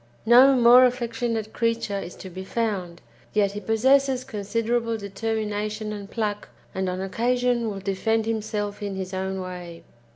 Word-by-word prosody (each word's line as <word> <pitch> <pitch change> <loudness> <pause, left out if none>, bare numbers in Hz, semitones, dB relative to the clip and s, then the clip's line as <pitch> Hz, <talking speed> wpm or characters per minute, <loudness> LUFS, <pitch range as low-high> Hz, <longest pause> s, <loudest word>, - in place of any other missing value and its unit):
No 255 +4 +7
more 245 +1 +7
affectionate 235 -3 -1
creature 230 -3 -1
is 180 - -8
to 190 - -9
be 185 +2 -7
found, 190 -6 -3 0.3
yet 205 -2 +2
he 205 - -5
possesses 260 +5 +2
considerable 230 +1 -1
determination 215 +1 -3
and 200 -1 -8
pluck, 210 -2 -3 0.2
and 190 0 -1
on 180 +1 -3
occasion 240 +3 0
will 195 -2 -6
defend 215 +3 0
himself 210 -2 -3
in 200 -1 -3
his 190 0 -5
own 190 0 -2
way. 180 -2 -7
215 Hz, 150 wpm, -25 LUFS, 195-230 Hz, 0.3 s, No